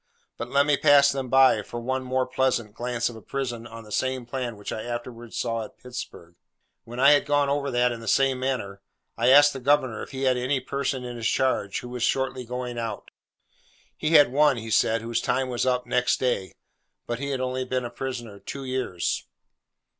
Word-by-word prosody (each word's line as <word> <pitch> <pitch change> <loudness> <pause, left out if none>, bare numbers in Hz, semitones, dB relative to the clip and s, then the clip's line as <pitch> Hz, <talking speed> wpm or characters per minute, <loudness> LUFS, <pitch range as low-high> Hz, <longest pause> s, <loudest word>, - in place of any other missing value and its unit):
But 120 - -6
let 140 +1 +3
me 145 -1 +3
pass 140 -1 +6
them 135 -2 -4
by, 130 -4 +5
for 120 - -7
one, 130 +2 -2
more 130 0 0
pleasant, 125 -4 0
glance 120 0 -2
of 120 - -6
a 110 - -11
prison 120 -3 -4
on 115 0 -10
the 105 - -14
same 130 +1 -1
plan 120 -2 -4
which 105 - -7
I 110 - -4
afterwards 120 -1 -6
saw 115 -1 -1
at - - -12
Pittsburg. 120 -9 -9 0.5
When 120 +2 -8
I 140 +2 +7
had 145 - +5
gone 145 -1 +2
over 140 0 0
that, 125 -1 +2
in 120 - -5
the 115 - -10
same 135 +4 +2
manner, 115 -7 -3 0.3
I 120 +2 +2
asked 145 +2 +7
the 135 - -6
governor 130 -3 +1
if - - -7
he 135 -1 -5
had 130 -1 +3
any 130 +2 0
person 135 0 -3
in 120 -1 -6
his 115 -1 -1
charge 130 -7 0
who 125 - -9
was 125 0 -6
shortly 130 0 0
going 125 0 -4
out. 115 -3 -5 0.8
He 155 +2 -1
had 145 -5 +7
one, 145 -1 +4
he 115 -1 -6
said, 110 +1 +3
whose 115 0 -1
time 130 +1 0
was 125 +1 -1
up 125 -1 +1
next 125 0 +1
day; 120 -7 -1 0.5
but 120 0 -3
he 140 0 -3
had 135 -2 -2
only 130 0 -2
been 130 -1 -2
a 120 - -6
prisoner 120 -5 -6
two 135 +5 -7
years. 130 -9 -2
125 Hz, 215 wpm, -25 LUFS, 120-135 Hz, 0.8 s, I